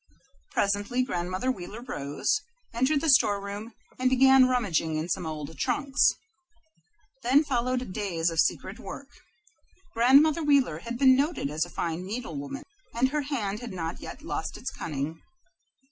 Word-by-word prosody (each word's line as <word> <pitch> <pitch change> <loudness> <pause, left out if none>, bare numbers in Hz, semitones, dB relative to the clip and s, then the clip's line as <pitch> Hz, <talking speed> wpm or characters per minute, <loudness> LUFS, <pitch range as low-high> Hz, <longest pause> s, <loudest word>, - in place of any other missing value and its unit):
Presently 205 +5 0
Grandmother 185 +2 -2
Wheeler 215 +2 -8
rose, 145 - -1 0.3
entered 260 +5 +2
the 325 - +1
storeroom, 205 -1 +1 0.2
and 255 0 +3
began 265 0 +6
rummaging 175 -11 0
in 155 +2 -2
some 175 -1 -2
old 155 0 -6
trunks. 275 -2 +2 1.1
Then 270 +4 +4
followed 250 -5 -1
days 175 -5 -1
of 165 - -3
secret - - 0
work. - - -8 0.8
Grandmother 280 +7 +5
Wheeler 280 - +3
had 235 +6 -5
been 260 0 +6
noted 280 - 0
as 155 +2 0
a - - -12
fine 170 0 -3
needlewoman, 185 - -5 0.3
and 255 +3 +2
her 300 +2 -1
hand 225 -8 -3
had 240 -4 -7
not 165 -3 -4
yet - - -9
lost - - -4
its - - -5
cunning. 155 +1 -5
225 Hz, 145 wpm, -27 LUFS, 170-260 Hz, 1.1 s, began